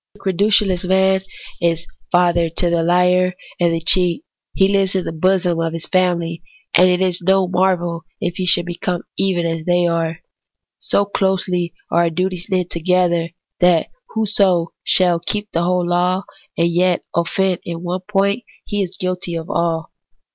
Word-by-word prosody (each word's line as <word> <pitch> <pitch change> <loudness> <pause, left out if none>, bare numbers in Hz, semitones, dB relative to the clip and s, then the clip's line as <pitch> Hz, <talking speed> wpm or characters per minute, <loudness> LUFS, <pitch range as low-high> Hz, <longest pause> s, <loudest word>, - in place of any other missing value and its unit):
The - - -19
credulous 195 -1 +2
man 190 +1 +2 0.4
is 170 -1 0 0.3
father 175 -2 +3
to 170 +2 0
the 170 -1 +2
liar 180 +1 +2 0.2
and 170 -1 +3
the 165 0 -1
cheat; 180 - +3 0.3
he 190 - +4
lives 195 -1 +1
in 185 - 0
the - - -3
bosom 175 +1 +1
of 165 -1 -1
this 165 -1 -5
his - - -7
family, 170 -3 0 0.3
and 185 0 +6
it 180 0 +1
is 185 -2 0
no 190 +1 +3
marvel 175 -3 0
if 175 0 -3
he 185 - -2
should 175 0 +4
become 175 0 -3
even 185 -3 0
as 165 -1 -2
they 175 0 +2
are. 165 -1 -1 0.6
So 200 - +1
closely 185 -3 -1 0.2
are - - +3
our 170 -1 +3
duties 180 +1 -2
knit 180 -2 -1
together, 170 -1 +1 0.3
that 175 -2 +3 0.3
whoso 195 -6 +1
shall 180 -2 +3
keep 205 +4 -3
the 170 - 0
whole 180 0 +1
law, 180 +2 +1 0.3
and 170 0 +2
yet 180 0 +2
offend 180 +2 0
in 170 0 -6
one 180 +1 -3
point, 200 +3 +1 0.2
he 205 -1 -2
is 185 -1 -4
guilty 180 -1 -3
of 165 0 -5
all. 165 -1 -1
180 Hz, 170 wpm, -19 LUFS, 170-190 Hz, 0.6 s, and